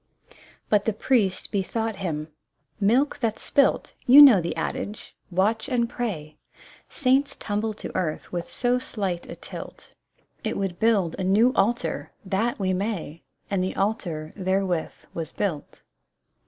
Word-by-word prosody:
But 210 Hz, -1 st, +2 dB
the 220 Hz, -, +2 dB
priest 210 Hz, -4 st, +1 dB
bethought 220 Hz, +2 st, -2 dB
him: 160 Hz, -5 st, -3 dB, 0.2 s
" -, -, -50 dB
' -, -, -43 dB
Milk 240 Hz, +8 st, +2 dB
that's 225 Hz, -3 st, -1 dB
spilt 280 Hz, -1 st, +2 dB
' -, -, -42 dB
— -, -, -30 dB
You 265 Hz, +4 st, +9 dB
know 260 Hz, -10 st, +10 dB
the 170 Hz, -, -3 dB
adage! 210 Hz, +1 st, -4 dB
Watch 215 Hz, +7 st, +1 dB
and 240 Hz, -3 st, +1 dB
pray! 165 Hz, -12 st, -4 dB, 0.5 s
Saints 275 Hz, 0 st, +2 dB
tumble 215 Hz, +1 st, -2 dB
to -, -, -8 dB
earth 155 Hz, -4 st, -2 dB
with 175 Hz, -1 st, -4 dB
so 245 Hz, 0 st, +1 dB
slight 195 Hz, -8 st, -4 dB
a -, -, -6 dB
tilt! -, -, -10 dB, 0.5 s
It -, -, -2 dB
would 190 Hz, -3 st, -3 dB
build 205 Hz, -7 st, +2 dB
a -, -, -1 dB
new 215 Hz, +7 st, +4 dB
altar; 235 Hz, +5 st, 0 dB
that, 205 Hz, +5 st, 0 dB
we 185 Hz, -2 st, 0 dB
may! 185 Hz, -5 st, -3 dB
" -, -, -33 dB
And 190 Hz, -2 st, +1 dB
the 185 Hz, -, -3 dB
altar 175 Hz, -7 st, -2 dB
therewith 190 Hz, -3 st, 0 dB, 0.2 s
was 165 Hz, -1 st, -4 dB
built. 170 Hz, -8 st, -4 dB
200 Hz, 160 wpm, -25 LUFS, 180-230 Hz, 0.5 s, know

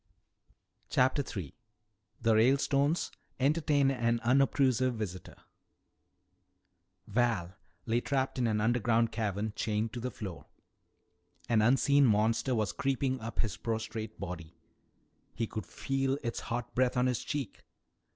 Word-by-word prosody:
CHAPTER 130 Hz, +3 st, +3 dB, 0.2 s
III 75 Hz, -7 st, -7 dB, 0.7 s
THE 115 Hz, -1 st, +3 dB
RALESTONES 140 Hz, +6 st, +2 dB, 0.3 s
ENTERTAIN 145 Hz, 0 st, +3 dB
AN 120 Hz, -2 st, +1 dB
UNOBTRUSIVE 130 Hz, 0 st, +3 dB
VISITOR 95 Hz, -6 st, -6 dB, 1.7 s
Val 105 Hz, -5 st, 0 dB, 0.3 s
lay 115 Hz, +1 st, +1 dB
trapped 135 Hz, -1 st, -1 dB
in 120 Hz, -, +2 dB
an 110 Hz, -1 st, +1 dB
underground 115 Hz, 0 st, +2 dB
cavern, 105 Hz, -1 st, -2 dB
chained 110 Hz, 0 st, -1 dB
to 120 Hz, -, -4 dB
the 125 Hz, +2 st, -3 dB
floor. 100 Hz, -7 st, -8 dB, 1.0 s
An 115 Hz, -3 st, +3 dB
unseen 135 Hz, +4 st, +4 dB
monster 110 Hz, +4 st, +2 dB
was 110 Hz, -4 st, 0 dB
creeping 135 Hz, -1 st, 0 dB
up 115 Hz, +1 st, -2 dB
his 110 Hz, -4 st, -3 dB
prostrate 110 Hz, -1 st, -4 dB
body. 85 Hz, -2 st, -7 dB, 0.8 s
He 115 Hz, -, -1 dB
could 110 Hz, -4 st, -6 dB
feel 135 Hz, 0 st, -1 dB
its 115 Hz, -, -2 dB
hot 120 Hz, 0 st, -3 dB
breath 130 Hz, 0 st, +1 dB
on 125 Hz, -, +3 dB
his 125 Hz, -3 st, 0 dB
cheek. 140 Hz, -6 st, -4 dB
120 Hz, 120 wpm, -31 LUFS, 110-130 Hz, 1.7 s, unseen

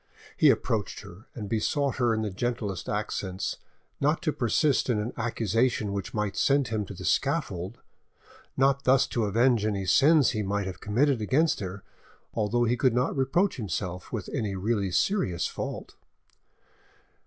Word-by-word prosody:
He -, -, +5 dB
approached -, -, 0 dB
her 95 Hz, +7 st, -13 dB
and 105 Hz, -4 st, -5 dB
besought 135 Hz, +6 st, 0 dB
her 120 Hz, -2 st, +2 dB
in 110 Hz, -1 st, 0 dB
the 105 Hz, -, -2 dB
gentlest 105 Hz, -2 st, -3 dB
accents 100 Hz, -2 st, -3 dB, 0.4 s
not 150 Hz, +5 st, +1 dB
to 155 Hz, -4 st, 0 dB
persist 130 Hz, +4 st, +1 dB
in 120 Hz, -, +2 dB
an 105 Hz, +3 st, -3 dB
accusation 115 Hz, -1 st, 0 dB
which 100 Hz, -1 st, -4 dB
might 105 Hz, -2 st, -2 dB
send 140 Hz, -1 st, +2 dB
him 110 Hz, -2 st, -1 dB
to -, -, -9 dB
the -, -, -8 dB
scaffold, 90 Hz, +6 st, -1 dB, 0.8 s
not 140 Hz, +1 st, +3 dB
thus 130 Hz, +1 st, +4 dB
to 115 Hz, -3 st, -1 dB
avenge 115 Hz, +2 st, +3 dB
any 100 Hz, -3 st, -1 dB
sins 140 Hz, -, +5 dB
he 110 Hz, -, -2 dB
might 100 Hz, 0 st, -1 dB
have 95 Hz, -1 st, -7 dB
committed 125 Hz, +4 st, +1 dB
against 145 Hz, +9 st, +2 dB
her, 100 Hz, 0 st, -6 dB, 0.5 s
although 115 Hz, +2 st, +1 dB
he 120 Hz, +1 st, +1 dB
could 125 Hz, -2 st, +2 dB
not 125 Hz, +1 st, +1 dB
reproach 145 Hz, +9 st, +1 dB
himself 90 Hz, -4 st, -4 dB
with 110 Hz, -6 st, -4 dB
any 110 Hz, -8 st, -2 dB
really 100 Hz, 0 st, 0 dB
serious 90 Hz, -, 0 dB
fault. -, -, -5 dB
110 Hz, 160 wpm, -27 LUFS, 100-130 Hz, 0.8 s, He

